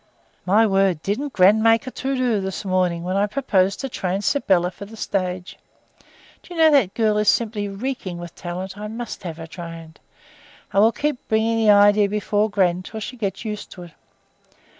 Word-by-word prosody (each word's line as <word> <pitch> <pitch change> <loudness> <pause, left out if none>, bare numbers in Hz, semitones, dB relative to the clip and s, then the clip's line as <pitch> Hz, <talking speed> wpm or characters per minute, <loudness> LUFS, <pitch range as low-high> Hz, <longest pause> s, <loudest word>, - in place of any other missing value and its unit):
"My 210 +5 +5
word, 195 -5 +1
didn't 265 +9 -2
gran 200 +1 +5
make 225 +2 +4
a 255 - -6
to 270 +2 -3
do 245 -5 +1
this 190 +1 -5
morning 180 -2 0
when 185 +2 -2
I 200 +1 +2
proposed 200 -6 +1
to 270 - -3
train 195 -5 -3
Sybylla 190 -9 +2
for 200 - -10
the 220 +2 -13
stage! 185 -3 -3 0.8
Do - - -18
you 345 - -6
know 320 -1 +6
that 260 -10 +3
girl 215 -2 +2
is 210 -1 +3
simply 215 -3 0
reeking 200 -3 -5
with 175 -1 -8
talent; 185 +3 -6
I 210 - -5
must 230 +2 -6
have 170 -4 -6
her 165 - -7
trained. 165 -1 -10 0.7
I 195 - +3
will 220 +3 +6
keep 295 +1 -3
bringing 220 +1 +1
the 220 -1 +3
idea 205 0 +5
before 210 +1 0
gran 185 -4 +2
until 200 +4 -8
she 235 +4 -6
gets 200 -2 -4
used 210 -1 -5
to 180 - -10
it. 175 - -12
205 Hz, 195 wpm, -22 LUFS, 185-225 Hz, 0.8 s, know